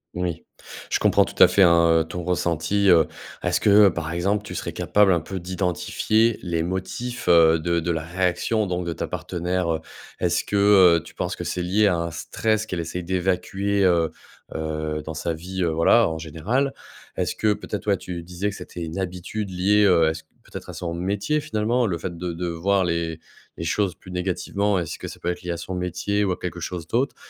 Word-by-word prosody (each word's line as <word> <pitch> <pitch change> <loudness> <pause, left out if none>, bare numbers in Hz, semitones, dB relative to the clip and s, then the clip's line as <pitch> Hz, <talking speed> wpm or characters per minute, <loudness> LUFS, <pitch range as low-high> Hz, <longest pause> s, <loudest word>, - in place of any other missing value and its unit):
Oui. 90 -2 -3 0.5
Je - - +2
comprends - - +4
tout - - -4
à - - +9
fait, 100 - +4
hein, 85 -1 +5
heu, - - 0
ton 85 +2 -6
ressenti, 90 +3 0
heu. 80 -3 +6 0.3
Est-ce 90 -1 +1
que, 105 - +2 0.2
heu, 90 - +1
par 85 -1 -4
exemple, 100 +4 0
tu - - -8
serais - - -4
capable 105 -2 +3
un 85 - +3
peu 95 +3 -6
d'identifier 95 +5 0
les 85 -2 -1
motifs, 105 +8 -4
heu, 80 -1 +6
de 85 +1 0
de 85 +1 -1
la 80 -1 -2
réaction 90 +5 0
donc 90 -1 -2
de 85 - -2
ta - - -4
partenaire, 90 -1 -2
heu? 80 - -2 0.4
Est-ce - - +1
que, 105 - -4 0.4
heu, - - -13
tu - - -14
penses - - -3
que - - -6
c'est 90 - -2
lié 100 +4 +3
à 90 - +2
un 85 0 -3
stress 110 +6 -1
qu'elle 90 - -3
essaie 85 +2 -4
d'évacuer, 95 +2 0
heu, 85 -3 +3 0.4
heu 80 -1 -3
dans 80 0 -6
sa 85 0 -2
vie, 90 +3 -4
heu, 85 - +2
voilà, 80 +1 +4
en 80 -1 -4
général? 100 - -1 0.4
Est-ce - - -1
que 110 -1 +2
peut-être, 105 0 -6
ouais, 100 - +3
tu 90 -2 -6
disais 90 +4 -3
que - - -9
c'était 85 - -8
une 80 +4 -5
habitude 95 +3 -4
liée, 100 +3 +3
heu, 85 -4 +5
à - - -1
son 80 - -9 0.2
peut-être - - -9
à - - -6
son 85 -1 -4
métier, 100 - -1
finalement? 115 +1 0
Le 85 - -1
fait 85 +1 -5
de 85 0 -4
de 90 +1 -4
voir 95 +3 +1
les 85 -1 -2 0.4
les 80 - -6
choses 95 +1 0
plus 90 - -16
négativement. 90 +2 -1
Est-ce 85 - -4
que - - -7
ça - - -9
peut 90 - -2
être 90 - -4
lié 90 - -3
à 85 - -3
son 90 +2 -5
métier 90 +3 -1
ou 95 - +1
à 90 - -2
quelque 90 -1 -5
chose 85 -1 -5
d'autre? 125 - 0
90 Hz, 220 wpm, -23 LUFS, 85-100 Hz, 0.5 s, à